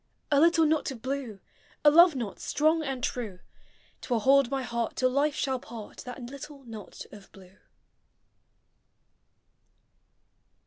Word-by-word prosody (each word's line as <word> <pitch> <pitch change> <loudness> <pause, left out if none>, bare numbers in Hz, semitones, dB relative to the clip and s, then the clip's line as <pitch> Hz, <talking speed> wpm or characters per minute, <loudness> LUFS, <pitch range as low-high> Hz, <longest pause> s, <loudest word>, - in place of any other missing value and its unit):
A 285 - +5
little 330 +1 +5
knot 310 0 +1
of 240 -4 -8
blue, 260 -6 -4 0.5
A 295 - +9
love 340 0 +7
knot 235 -6 -5
strong 315 +2 +1
and 270 -4 -4
true, 220 -7 -3 0.6
T - - -9
will 230 -2 +2
hold 275 +1 +4
my 270 -1 -2
heart 235 -1 -3
till 255 0 +1
life 285 +2 +1
shall 265 -2 -1
part 225 -3 -10
— - - -14
That 250 0 -8
little 275 +2 -10
knot 220 -4 -10
of 205 -2 -14
blue. 190 0 -17
265 Hz, 145 wpm, -28 LUFS, 235-290 Hz, 0.6 s, A